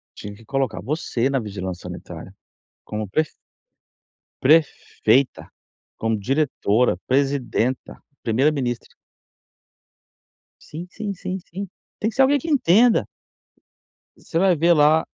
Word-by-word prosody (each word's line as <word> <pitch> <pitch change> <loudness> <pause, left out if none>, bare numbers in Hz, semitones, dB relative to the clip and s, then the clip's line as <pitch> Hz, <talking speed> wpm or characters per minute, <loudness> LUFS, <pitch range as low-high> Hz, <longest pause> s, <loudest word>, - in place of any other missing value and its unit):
Tinha 100 0 -8
que 115 +1 -17
colocar 135 -4 -1
você 135 -3 -1
na 135 -1 +1
vigilância 95 -4 -6
sanitária, - - -9 0.5
como 105 -1 -4
pref 155 +10 0 1.1
prefeita, 140 -4 +2 0.5
como 115 -1 0
diretora, 125 - +1
presidenta, 130 -2 0 0.2
primeira-ministra. 125 0 0 1.7
Sim, 170 +4 -8
sim, 205 0 -5
sim, 185 +1 -5
sim. 190 +3 -7 0.3
Tem 220 - 0
que 220 - -10
ser 270 - +4
alguém 280 +2 +4
que 330 - -6
entenda. 240 - +4 1.1
Você 165 - -4
vai 190 -2 +4
ver 170 +3 +4
lá 155 +1 +4
140 Hz, 110 wpm, -22 LUFS, 115-175 Hz, 1.7 s, ser